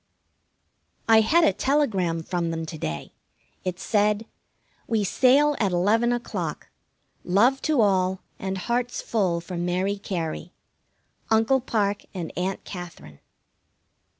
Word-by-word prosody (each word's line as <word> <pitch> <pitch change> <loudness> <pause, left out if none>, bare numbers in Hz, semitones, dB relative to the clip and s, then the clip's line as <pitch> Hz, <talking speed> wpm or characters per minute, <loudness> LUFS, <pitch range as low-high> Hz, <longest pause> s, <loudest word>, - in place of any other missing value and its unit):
I 225 -1 +7
had 325 +10 +4
a 320 - +4
telegram 195 - 0
from 170 0 -2
them 165 0 -3
to 160 0 -7
day. 75 - -5 0.5
It 185 -1 -3
said: 210 +1 +1 0.6
We 225 -2 +1
sail 275 +8 +4
at 200 -4 +1
eleven 215 +7 +2
o'clock. 240 0 -4 0.5
Love 235 +9 +3
to 300 -6 +2
all, 190 -2 +2 0.2
and 190 0 -3
hearts 240 +5 -1
full 185 -7 0
for 175 +1 -7
Mary 180 +3 -1
Cary. 170 -2 -4 0.8
UNCLE 225 +4 +3
PARKE 205 -5 -1
and 170 -3 -5
AUNT 185 +2 -2
KATHERINE. 170 - -9
200 Hz, 125 wpm, -25 LUFS, 175-230 Hz, 0.8 s, I